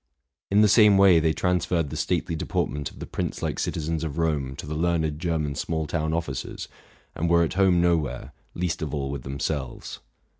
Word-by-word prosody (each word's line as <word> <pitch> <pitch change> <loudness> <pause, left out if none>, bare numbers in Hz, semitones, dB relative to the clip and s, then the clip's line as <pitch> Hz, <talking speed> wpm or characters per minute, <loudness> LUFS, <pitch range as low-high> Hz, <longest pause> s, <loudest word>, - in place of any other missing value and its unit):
In 100 +2 +4
the 105 - +6
same 105 -2 +6
way 95 -4 +7
they 80 0 +2
transferred 85 -3 0
the - - -5
stately 85 - -1
deportment 75 -2 -2
of - - -17
the - - -6
prince - - -4
like - - -2
citizens 80 0 -2
of 80 -1 -4
Rome 75 -5 -1
to 75 - -7
the 75 - -5
learned 80 -2 0
German 80 -4 -1
small 80 +2 -2
town 80 0 -1
officers, 80 -5 -4 0.5
and 85 +1 -1
were 85 0 +5
at 85 - -1
home 95 -2 +4
nowhere, 80 -7 0 0.2
least 85 -1 -2
of 75 -1 -3
all 70 -1 -3
with 70 -2 -4
themselves. 70 0 -4
80 Hz, 190 wpm, -25 LUFS, 75-85 Hz, 0.5 s, way